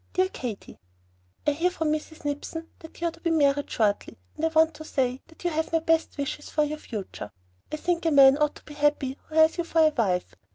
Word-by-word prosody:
DEAR 370 0 +2
KATY, 240 - -7 0.7
I 295 - +4
hear 330 +5 +1
from 320 -4 -1
Mrs. 310 0 -4
Nipson 310 +3 -4
that 320 - -13
you 340 - 0
are - - -1
to - - -17
be 335 - -1
married 285 -3 +2
shortly, 210 -2 0 0.2
and - - -7
I - - +5
want 320 0 +3
to 310 - -10
say 260 -4 -1
that 325 +1 -17
you 350 - 0
have 320 0 -1
my 330 - +3
best 325 -1 +1
wishes 285 +1 -4
for 305 - +1
your 300 +1 -3
future. 195 - -7 0.4
I - - -1
think 335 +1 0
a - - +3
man 275 -2 +8
ought 300 0 +2
to - - -14
be 300 - -10
happy 290 -2 0
who 310 - -10
has 315 +2 +5
you - - +2
for 335 - -5
a 310 - +6
wife. 200 -11 -1
305 Hz, 240 wpm, -26 LUFS, 280-325 Hz, 0.7 s, man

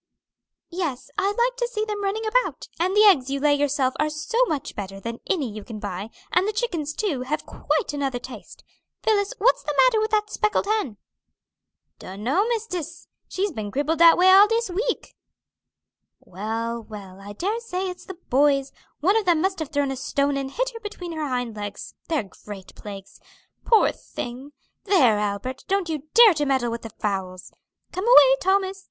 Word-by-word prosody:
"Yes, 335 -8 -4
I 395 -1 +1
like 480 +4 +1
to 485 -1 0
see 435 -3 -2
them 415 -1 -4
running 420 +3 -1
about, - - 0
and 370 +3 +1
the 425 - +7
eggs 295 -12 +5
you 275 0 -1
lay 295 +1 +3
yourself 285 -2 +1
are 305 - +2
so 380 +11 0
much 295 -4 -3
better 195 -1 -6
than 230 +3 -6
any 310 -9 +1
you 215 -1 -8
can 225 0 -8
buy, 205 0 -5 0.2
and 365 +3 +2
the - - +1
chickens, 335 -10 -2
too, 350 - -1
have 290 +5 -3
quite 410 -11 -2
another 275 -3 -1
taste. 255 +1 -11 0.4
Phillis, 420 +1 +1
what's 460 +4 +3
the 295 - -3
matter 455 -3 +3
with 435 - 0
that 425 -1 0
speckled 425 -2 0
hen?" 405 - -1 1.0
"Dunno, 240 - -1
mistis; 360 -8 -4 0.2
she's 395 +1 -2
been 215 -7 -5
crippled 295 +7 -1
dat 335 -1 +8
way 370 +1 +6
all 395 +2 +8
dis 455 -2 0
week." 455 +7 -2 1.0
"Well, 225 +5 -4
well, 200 -4 -11
I 205 +1 -9
dare 405 - -2
say 380 -5 -3
it's 360 -1 -7
the 380 - -8 0.2
boys; 275 +1 +3 0.3
one 380 +7 +3
of 440 - 0
them 345 -3 +3
must 380 +2 0
have 315 -3 -4
thrown 285 -2 0
a - - -3
stone 280 +2 0
and 275 -1 -3
hit - - -2
her 460 - -9
between 410 -5 -7
her 310 -2 -3
hind 245 -3 -2
legs; 205 -1 -7
they're 305 -11 -1 0.2
great 200 -3 -9
plagues. 200 -2 -10 0.5
Poor 450 -2 +5
thing! 255 +4 -8 0.3
There, 265 - +4
Albert, 210 +6 -3
don't 390 -3 0
you 310 -2 -4
dare 460 -4 +9
to 300 -2 -1
meddle 260 -3 +1
with 230 0 -4
the 225 - -8
fowls! 190 -3 -4 0.4
Come 370 +3 -3
away, 275 - +8
Thomas. 385 0 +1
305 Hz, 185 wpm, -24 LUFS, 245-405 Hz, 1.0 s, dare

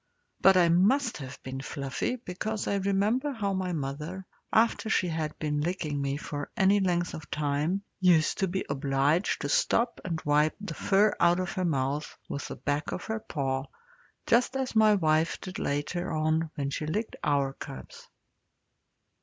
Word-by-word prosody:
But 190 -1 +7
I 175 -2 +5
must 215 +10 +3
have 135 -2 -8
been 130 0 -5
fluffy, 140 - -3
because 215 -1 -4
I 200 - +1
remember 205 +9 +1
how 200 -5 -1
my 185 -1 -1
mother, 155 +5 -4 0.3
after 225 0 +2
she 185 -4 +2
had 160 -2 -3
been 150 -1 -1
licking 155 -4 -2
me 140 0 -1
for 145 -1 -5
any 195 0 +4
length 175 -2 0
of 155 - -8
time, 150 +6 0 0.2
used 175 -4 +4
to 195 - +2
be 190 +2 -2
obliged 140 +5 +1
to 145 - -2
stop 235 - +2
and 165 -3 -2
wipe 150 +1 +3
the 205 - -5
fur 205 +2 +3
out 175 +1 +4
of 185 0 -2
her 185 -2 -1
mouth 140 -1 -1
with 140 - -4
the - - -6
back 145 0 -2
of - - -4
her 220 0 -2
paw, 135 -8 -2 0.6
just 245 +2 +3
as 265 -3 -2
my 215 -1 +6
wife 160 -3 +2
did 185 0 -7
later 155 +6 -2
on 155 +1 +1
when 140 -2 -2
she 150 - -3
licked 215 +8 -2
our 140 -2 +1
cubs. 65 - -10
170 Hz, 170 wpm, -28 LUFS, 145-195 Hz, 0.6 s, But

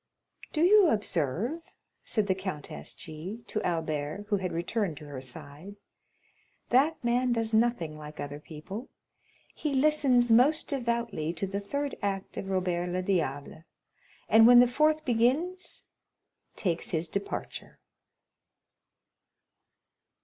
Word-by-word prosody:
"Do 310 - +1
you 400 +1 +7
observe," 210 - -1 0.4
said 215 -3 0
the 190 - +2
Countess 155 - -6
G—— 175 +9 -8
to 215 - -3
Albert, 160 +1 -2
who 205 - +2
had 185 -2 -3
returned 175 0 -2
to 150 - -10
her 140 -3 -7
side, 145 +8 -10 0.9
"that 280 +4 +3
man 245 +1 +2
does 225 -1 -1
nothing 220 -10 +1
like 150 0 -10
other 145 0 -5
people; 165 - -8 0.6
he 295 -3 -2
listens 265 -4 +4
most 280 +8 +4
devoutly 235 - -1
to 175 +3 -3
the 195 +1 -3
third 280 +7 -3
act 195 -1 -3
of 195 - -5
Robert 180 -2 0
le 180 +1 -2
Diable, 160 -5 -2 0.6
and 225 +1 +7
when 245 0 +9
the 245 - +7
fourth 305 +5 +2
begins, 290 +10 0 0.7
takes 175 -5 -1
his 165 0 -1
departure." 200 +4 -5
200 Hz, 125 wpm, -29 LUFS, 165-245 Hz, 0.9 s, when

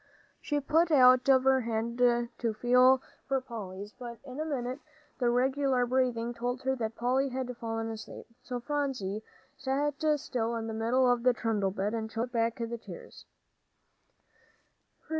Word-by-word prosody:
She 295 -1 -1
put 320 +4 +2
out 255 -4 +6
her 270 -1 +7
little 265 0 +3
hand 230 0 -2 0.4
to 230 -2 0
feel 250 +3 +5 0.2
for 270 -1 +1
Polly's, 205 -5 -8
but 240 -2 -8
in 260 +1 -8
a 310 - -1
minute 260 -3 -3 0.4
the 245 -2 +2
regular 260 +1 +2
breathing 245 -2 0
told 245 +2 -3
her 265 0 +1
that 225 -2 -3
Polly 260 +3 +1
had 255 -1 -4
fallen 225 -1 -3
asleep. 220 -1 -9 0.2
So 250 -2 -5
Phronsie 255 -7 -2 0.4
sat 280 +2 -1 0.2
still 235 -3 -2
in 225 -1 -3
the 225 - -4
middle 235 +4 +2
of 245 -1 +3
the 250 +1 +4
trundle 215 -4 0
bed, 200 +2 -2
and 220 -1 -3
choked 235 +2 -3
back 230 -1 +1
the 235 0 -4
tears. - - -11
245 Hz, 160 wpm, -30 LUFS, 230-265 Hz, 0.4 s, her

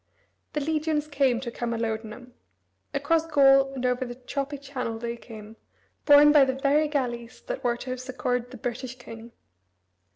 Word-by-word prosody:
The 300 - -1
legions 305 0 -1
came 275 -5 +1
to 240 -3 -5
Camalodunum. 230 0 -4 0.6
Across 320 +3 +1
Gaul 275 -3 +5
and 255 -1 -3
over 250 +1 +1
the 245 -1 -6
choppy 275 +3 -4
channel 265 -5 -5
they 235 +1 -4
came, 220 -2 -12 0.5
borne 290 0 +8
by 295 -2 +7
the 260 -1 0
very 285 +3 +2
galleys 245 -5 -3
that - - -5
were 240 -1 +1
to 255 - -6
have 255 0 -4
succored 250 -1 -2
the 255 - -10
British 245 +2 -5
king. 230 0 -11
255 Hz, 160 wpm, -26 LUFS, 235-280 Hz, 0.6 s, borne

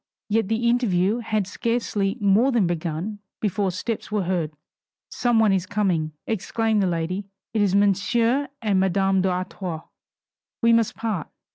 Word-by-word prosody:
Yet 220 -1 +2
the 225 +2 0
interview 220 -3 +2
had 215 -3 -1
scarcely 210 -1 -1
more 205 +6 +4
than 235 -6 +3
begun 175 +4 -3 0.2
before 200 -1 0
steps 210 +5 -4
were 210 -2 +1
heard. 175 -4 -1 0.6
"Some 240 -2 +1
one 220 -3 +4
is 185 -1 0
coming," 180 -7 0
exclaimed 220 0 0
the 190 - +2
lady, 180 +3 -2 0.3
"it 220 - +1
is 200 -2 +2
Monsieur 230 +7 +2 0.2
and 200 -3 +2
Madame 190 0 +2
d'Artois 180 -2 -3 0.8
We 230 -1 +4
must 230 -2 +2
part. 220 -7 -3
200 Hz, 145 wpm, -24 LUFS, 185-225 Hz, 0.8 s, more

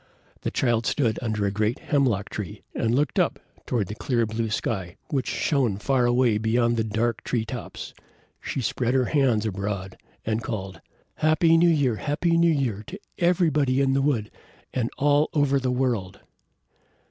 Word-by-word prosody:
The - - -1
child 120 -3 +1
stood 115 -6 +1
under 110 -3 -1
a 100 - +1
great 105 +3 0
hemlock 125 -9 0
tree, 100 -5 -6
and 115 +1 0
looked 145 +3 +1
up - - +1 0.3
toward 115 -5 0
the 100 - -6
clear 115 +1 0
blue 110 +1 -2
sky, 95 -5 -2
which 135 -3 -1
shone 130 -10 +1
far 125 +3 +1
away 120 -3 +3
beyond 115 +2 +2
the 115 - +1
dark 110 +2 -1
tree 115 -3 -1
tops. 110 - -7 0.5
She 135 - -3
spread 125 +2 0
her 130 -1 +3
hands 125 -8 +2
abroad 100 -2 -3 0.3
and 110 +1 0
called, 95 -6 -5 0.4
"Happy 155 +1 +4
New 170 +1 +5
Year! 140 -8 +2
Happy 165 +6 0
New 170 0 +4
Year 125 -9 -1
to 195 - -7 0.2
everybody 160 -7 +2
in 135 -1 +2
the 135 - +2
wood, 125 -7 0 0.4
and 120 -2 0
all 145 +1 +3
over 140 -2 +3
the 130 -1 -1
world!" 120 -7 -1
120 Hz, 170 wpm, -25 LUFS, 110-140 Hz, 0.5 s, New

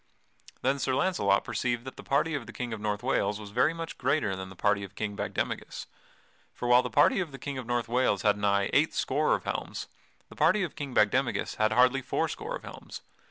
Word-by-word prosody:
Then 135 +2 +1
Sir 130 -1 0
Launcelot 100 - +2
perceived 120 +1 -2
that 130 - -7
the - - -9
party 150 +4 +1
of 140 -6 -3
the - - -8
King 120 -2 -4
of 110 - -6
North 105 -1 -2
Wales 100 +1 0
was 105 -1 -9
very 125 +8 +3
much 165 0 -7
greater 130 -6 +1
than 95 0 -6
the 95 - -12
party 100 +2 +1
of 100 +1 -9
King 105 -2 -3
Bagdemagus; - - -3 0.7
for 120 - -4
while 120 +1 +6
the 125 - -4
party 110 - +4
of 175 -5 -2
the 135 - -8
King 140 -1 -5
of 125 - -7
North 120 -1 0
Wales 120 -4 +1
had 105 -1 +4
nigh 100 -1 +1
eight - - +3
score - - +2
of - - -5
helms, - - -4 0.4
the - - -14
party 180 +7 +3
of 170 - -4
King 140 -4 -6
Bagdemagus 105 -1 +1
had 110 0 +2
hardly 125 +3 +4
four 125 - -1
score - - -5
of - - -8
helms. - - -9
120 Hz, 225 wpm, -29 LUFS, 105-135 Hz, 0.7 s, while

